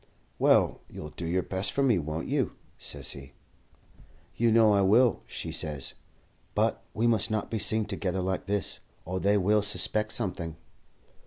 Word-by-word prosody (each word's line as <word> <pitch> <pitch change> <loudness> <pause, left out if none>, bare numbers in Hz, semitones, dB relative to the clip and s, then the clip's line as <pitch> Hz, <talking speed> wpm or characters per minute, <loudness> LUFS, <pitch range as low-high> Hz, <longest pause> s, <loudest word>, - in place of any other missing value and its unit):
"'Well, - - +3
you'll 75 - -8
do 85 - -6
your 90 +2 0
best 95 +2 -2
for 140 - 0
me, 120 -9 +3
won't 80 +1 -4
you?' - - 0 0.3
says - - -2
he. 70 0 -9 1.0
"'You 115 0 +2
know 110 -2 +5
I 100 - +4
will,' 110 +4 +4
she - - -5
says; 75 -4 -3 0.6
'but - - +1
we 115 - +1
must 110 -3 +2
not 110 -1 -2
be 110 - -1
seen 110 +1 +3
together 95 -2 -2
like 95 0 -2
this, 100 -3 -1 0.3
or 95 +2 -3
they 100 +2 +3
will 105 +2 +3
suspect 105 +1 +2
something.' 85 -7 -2
100 Hz, 165 wpm, -28 LUFS, 90-110 Hz, 1.0 s, know